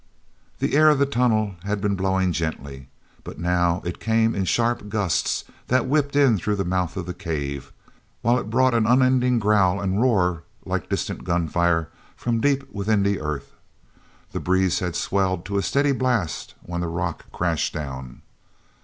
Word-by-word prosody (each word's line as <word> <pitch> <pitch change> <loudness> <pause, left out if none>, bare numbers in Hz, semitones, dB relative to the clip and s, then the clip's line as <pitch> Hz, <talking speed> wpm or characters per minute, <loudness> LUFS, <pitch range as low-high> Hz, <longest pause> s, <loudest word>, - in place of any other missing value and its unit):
he - - -1
air 155 +1 +7
of 150 - +4
the 140 - +3
tunnel 110 -7 +1
had 100 +1 -2
been 100 0 0
blowing 95 -1 +1
gently, 70 -5 -4 0.4
but - - -9
now 85 +1 +1
it 85 - -4
came 115 0 +2
in 95 - -1
sharp 115 +1 0
gusts 100 -4 0 0.2
that 130 0 +2
whipped 140 +1 +1
in 135 -8 +4
through 105 +4 -1
the 95 - -2
mouth 90 0 -1
of 90 - -3
the 90 - -5
cave, 75 -7 -4 0.5
while 120 +2 +3
it 105 - -6
brought 130 +2 +3
an 115 -2 +2
unending 125 0 +4
growl 100 -3 +3
and 100 +1 0
roar 90 -9 +2 0.2
like - - -3
distant - - -3
gunfire 85 -1 +1 0.3
from 115 -2 -1
deep 140 0 +2
within 100 0 +1
the 100 -1 +1
earth. 75 -2 -4 0.8
The - - -3
breeze 95 0 +1
had 90 -2 -3
swelled 95 -2 0
to 100 0 -1
a - - +1
steady 140 +9 +2
blast 125 -10 -1
when 85 0 -4
the 85 - -2
rock 85 0 -3
crashed 85 -3 -1
down. 65 -4 -7
100 Hz, 170 wpm, -23 LUFS, 85-120 Hz, 0.8 s, air